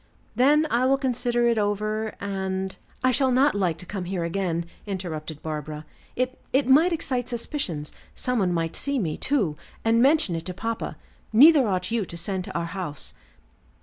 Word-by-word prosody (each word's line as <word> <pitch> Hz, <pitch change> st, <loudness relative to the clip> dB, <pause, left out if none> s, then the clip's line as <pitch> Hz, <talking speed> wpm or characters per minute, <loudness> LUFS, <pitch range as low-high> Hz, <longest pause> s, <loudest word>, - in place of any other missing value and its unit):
"Then 290 Hz, +6 st, +5 dB
I 245 Hz, +2 st, +3 dB
will 270 Hz, +1 st, +4 dB
consider 245 Hz, -2 st, +1 dB
it 230 Hz, -2 st, +2 dB
over, 215 Hz, +1 st, -1 dB
and 190 Hz, -1 st, -3 dB
" -, -, -31 dB
"I 255 Hz, -, +4 dB
shall 265 Hz, +1 st, +3 dB
not 270 Hz, +4 st, +4 dB
like 180 Hz, -5 st, 0 dB
to 180 Hz, -, -8 dB
come 190 Hz, -1 st, -5 dB
here 180 Hz, -1 st, -2 dB
again," 170 Hz, -1 st, -1 dB, 0.2 s
interrupted 160 Hz, -6 st, -5 dB
Barbara. 155 Hz, -1 st, -5 dB, 0.3 s
"It 255 Hz, +1 st, -2 dB
it 270 Hz, 0 st, +2 dB
might 310 Hz, +7 st, +6 dB
excite 260 Hz, -7 st, -1 dB
suspicions; 230 Hz, -, -3 dB, 0.2 s
some 250 Hz, -2 st, -1 dB
one 185 Hz, -3 st, +2 dB
might 165 Hz, -1 st, -1 dB
see 280 Hz, -1 st, -1 dB
me, 165 Hz, -10 st, -1 dB
too, 205 Hz, -, 0 dB, 0.3 s
and 230 Hz, +1 st, +4 dB
mention 275 Hz, -, +3 dB
it 165 Hz, +1 st, -5 dB
to 180 Hz, -, -5 dB
papa. 225 Hz, +3 st, -3 dB, 0.3 s
Neither 275 Hz, +3 st, +7 dB
ought 185 Hz, +1 st, -1 dB
you 230 Hz, -2 st, +1 dB
to 170 Hz, -, -8 dB
send 185 Hz, +1 st, -2 dB
to -, -, -4 dB
our 170 Hz, -, -1 dB
house." 170 Hz, -4 st, -3 dB
205 Hz, 180 wpm, -25 LUFS, 175-255 Hz, 0.3 s, Neither